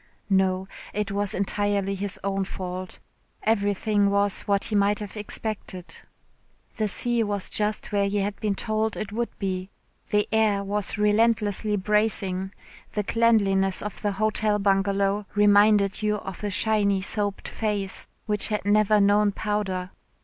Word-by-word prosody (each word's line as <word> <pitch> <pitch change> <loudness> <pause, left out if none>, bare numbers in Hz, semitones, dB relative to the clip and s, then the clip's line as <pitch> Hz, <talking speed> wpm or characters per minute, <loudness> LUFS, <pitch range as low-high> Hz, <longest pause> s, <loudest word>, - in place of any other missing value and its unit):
No, 190 0 +2 0.3
it 210 0 -1
was 205 +1 -1
entirely 200 0 +1
his 195 0 -4
own 195 0 0
fault. 185 -1 -6 0.5
Everything 205 -1 +1
was 200 0 +1
what 200 -1 +2
he - - -3
might 205 +1 +3
have 205 0 -7
expected. 210 -3 -5 0.8
The 215 - +1
sea 240 +3 +1
was 205 -3 -2
just 215 +1 -1
where 200 -1 +2
he 205 - -1
had 200 0 -2
been 210 -2 -1
told 220 +1 -1
it 215 - -4
would 235 +2 -2
be, 185 -1 -3 0.4
the 210 0 +2
air 215 -2 +2
was 205 +1 -2
relentlessly 210 -1 +2
bracing, 195 -2 +1 0.4
the 210 - -1
cleanliness 195 -4 +2
of 210 - -6
the 205 -2 0
Hotel 215 +1 +1
Bungalow 200 0 +1
reminded 205 -1 +4
you 210 0 +1
of 195 -1 -7
a 205 - -1
shiny 200 -1 +1
soaped 205 0 -1
face 205 -3 -3 0.2
which 210 -2 +1
had 210 -2 -2
never 210 +1 +4
known 205 +1 +4
powder. 195 -3 -2
205 Hz, 145 wpm, -25 LUFS, 195-210 Hz, 0.8 s, reminded